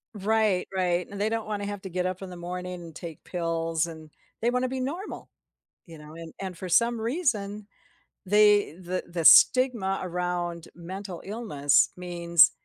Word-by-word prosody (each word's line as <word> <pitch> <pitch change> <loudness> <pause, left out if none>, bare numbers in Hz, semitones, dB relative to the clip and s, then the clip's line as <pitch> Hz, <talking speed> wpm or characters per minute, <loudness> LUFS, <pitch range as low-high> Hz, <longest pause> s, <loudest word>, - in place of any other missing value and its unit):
Right, 210 -2 +1
right, 180 -1 0
and 200 0 -6
they 210 - +2
don't 225 0 -2
wanna 205 -1 -3
have 205 -1 -5
to 190 - -6
get 180 0 -2
up 185 0 -3
in 190 - -7
the - - -8
morning 180 +1 -6
and 165 -2 -11
take 165 -3 -9
pills, 165 -2 -1
and 160 -2 -10 0.3
they 235 - +2
want 250 +1 0
to 255 - 0
be 260 0 -3
normal, 320 +10 -5 0.6
you 165 -2 -11
know. 150 +1 -12
And 165 -1 -10
and 185 -3 -6
for 185 - -6
some 235 +6 +3
reason, 220 - -1 0.6
they 205 -2 +4
the 180 +1 -4
the 170 -2 -3
stigma 235 -6 +6
around 175 -1 -3
mental 185 +1 -7
illness 190 - +2
means 170 -2 +4
185 Hz, 175 wpm, -27 LUFS, 170-210 Hz, 0.6 s, stigma